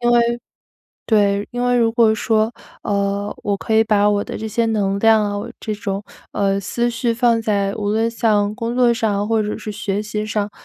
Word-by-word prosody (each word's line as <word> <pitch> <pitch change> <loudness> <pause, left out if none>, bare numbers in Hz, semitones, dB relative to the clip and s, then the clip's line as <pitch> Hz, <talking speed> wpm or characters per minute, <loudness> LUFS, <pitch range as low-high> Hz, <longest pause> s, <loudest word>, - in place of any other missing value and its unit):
因 240 0 +2
为 235 0 +2 0.6
对， 205 -2 +2
因 245 0 -2
为 245 0 +2
如 230 -1 +2
果 225 -2 +4
说， 220 +1 +1 0.3
呃， 200 0 -1
我 200 -1 0
可 220 - -4
以 220 0 +5
把 210 -1 +3
我 205 0 0
的 - - -6
这 220 - -5
些 230 +2 0
能 200 -3 0
量 220 0 +4 0.2
啊， 230 - -6
这 215 - -3
种， 205 -2 -4 0.3
呃， 195 -1 +1
思 235 +5 -1
绪 235 0 -1
放 235 -1 +2
在 200 -3 0
无 205 -1 -2
论 225 +2 +1
像 210 -3 +1
工 235 0 -3
作 245 -1 +4
上 210 -3 -1
或 225 -1 +2
者 210 0 -2
是 215 - -6
学 205 -1 -3
习 215 0 -4
上， 210 -1 -2
215 Hz, 220 characters per minute, -20 LUFS, 205-230 Hz, 0.6 s, 以